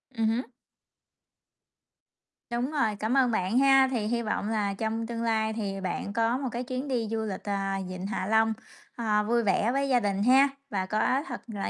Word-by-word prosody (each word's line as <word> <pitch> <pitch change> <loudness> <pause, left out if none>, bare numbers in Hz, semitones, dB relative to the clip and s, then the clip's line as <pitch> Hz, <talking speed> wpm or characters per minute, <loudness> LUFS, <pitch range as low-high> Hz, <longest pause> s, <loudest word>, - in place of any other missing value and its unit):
Ừm 225 -1 +1
hứm. 235 +4 -1 2.0
Đúng 240 +3 -2
rồi, 230 -9 +1
cảm 225 +5 0
ơn 255 -3 +4
bạn 215 +3 +1
ha. 270 -1 +6
Thì 230 -5 -1
hi 235 +1 0
vọng 215 -1 -2
là 210 -3 0
trong 220 +2 -2
tương 230 0 -4
lai 220 -1 +1
thì 200 -3 -4
bạn 190 +2 -3
có 230 +2 +1
một 265 -1 -3
cái 240 +2 -3
chuyến 255 +2 -4
đi 240 -5 -1
du 225 -1 -1
lịch, 195 -3 -5
ờ, 200 -1 -1 0.3
Vịnh 185 +1 -5
Hạ 210 -3 -3
Long, 220 +1 +3 0.4
ờ, 215 -3 +1
vui 235 +2 +1
vẻ 210 +2 +2
với 275 +1 0
gia 250 -2 +4
đình 200 -2 -1
ha 265 +4 +6 0.2
và 195 -5 -1
có 235 +7 +1
thật 250 - -6
là 205 -4 -4
225 Hz, 200 wpm, -28 LUFS, 210-250 Hz, 2.0 s, ha